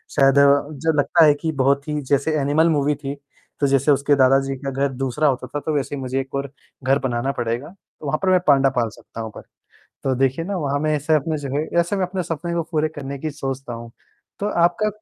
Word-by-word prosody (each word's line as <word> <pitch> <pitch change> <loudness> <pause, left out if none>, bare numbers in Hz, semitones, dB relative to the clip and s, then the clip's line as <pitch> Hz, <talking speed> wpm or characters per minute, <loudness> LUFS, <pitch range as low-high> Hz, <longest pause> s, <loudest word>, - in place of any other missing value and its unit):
शायद 135 -1 +5 0.5
जो 160 0 +2
लगता 165 +3 +5
है 150 - +6
कि 160 - -1
बहुत 140 +2 +2
ही 150 -1 -1
जैसे 145 +2 +2
एनिमल 150 +4 +3
मूवी 145 -2 +1
थी। 140 0 -6 0.4
तो 140 - +2
जैसे 135 +2 +3
उसके 145 +1 +3
दादा 135 0 +5
जी 135 - -2
का 135 - -1
घर 135 +1 0
दूसरा 135 +3 0
होता 130 -3 0
था - - +1
तो 155 +2 -3
वैसे 140 0 -1
ही 135 - -6
मुझे 130 +1 -2
एक 135 0 -5
और 140 -1 -3 0.3
घर 135 +2 +3
बनाना 130 +1 -1
पड़ेगा, 120 +2 -3
तो 180 -4 -17
वहाँ 150 +2 0
पर 190 - +3
मैं 185 -1 +5
पांडा 135 -2 +5
पाल 120 -3 0
सकता 115 - -10
हूँ 110 -1 -6
पर, - - -8 0.6
तो 135 -1 +1
देखिए 135 +5 0
ना 200 +1 -2
वहाँ 145 -3 -1
मैं 155 +1 +1
ऐसे 150 +2 0
अपने 155 +1 0
जो 140 -2 -5
है 150 - 0
ऐसे 170 +4 0
मैं 190 -2 +1
अपने 185 0 -3
सपने 170 +1 -4
को 170 -1 0
पूरे 155 -1 +1
करने 140 0 -5
की 155 +2 -3
सोचता 135 -2 -5
हूँ। 115 0 -8 0.5
तो 205 - -1
आपका, 175 +4 +2
140 Hz, 240 wpm, -21 LUFS, 135-155 Hz, 0.6 s, है